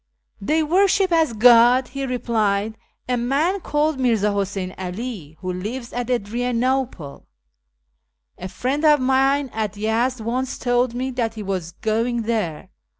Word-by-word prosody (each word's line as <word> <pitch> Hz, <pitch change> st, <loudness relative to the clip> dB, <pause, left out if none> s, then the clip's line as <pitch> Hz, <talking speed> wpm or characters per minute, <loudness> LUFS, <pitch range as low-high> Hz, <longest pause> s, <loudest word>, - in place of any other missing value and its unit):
" -, -, -38 dB
They 315 Hz, +1 st, +3 dB
worship 380 Hz, +3 st, +2 dB
as 320 Hz, -6 st, +2 dB
God," 240 Hz, +3 st, +6 dB
he 275 Hz, +1 st, -4 dB
replied, 220 Hz, -4 st, 0 dB, 0.2 s
" -, -, -48 dB
a 250 Hz, -1 st, 0 dB
man 285 Hz, +11 st, 0 dB
called 300 Hz, -3 st, 0 dB
Mirza 225 Hz, -5 st, +2 dB
Huseyn 195 Hz, -2 st, -3 dB
'All, 185 Hz, -, -6 dB
who 185 Hz, -1 st, -3 dB
lives 235 Hz, +7 st, -6 dB
at 245 Hz, 0 st, -3 dB
Adrianople. 245 Hz, -, -2 dB, 1.1 s
A 185 Hz, -, -5 dB
friend 260 Hz, -, -2 dB
of 300 Hz, -2 st, +5 dB
mine 270 Hz, +1 st, +2 dB
at 215 Hz, -3 st, -2 dB
Yezd 230 Hz, +4 st, 0 dB
once 245 Hz, +4 st, -3 dB
told 245 Hz, -1 st, 0 dB
me 260 Hz, +2 st, -2 dB
that 235 Hz, -3 st, -2 dB
he 215 Hz, -, -6 dB
was 185 Hz, -4 st, -4 dB
going 230 Hz, +4 st, -1 dB
there. 215 Hz, -9 st, -2 dB
240 Hz, 150 wpm, -22 LUFS, 210-265 Hz, 1.1 s, God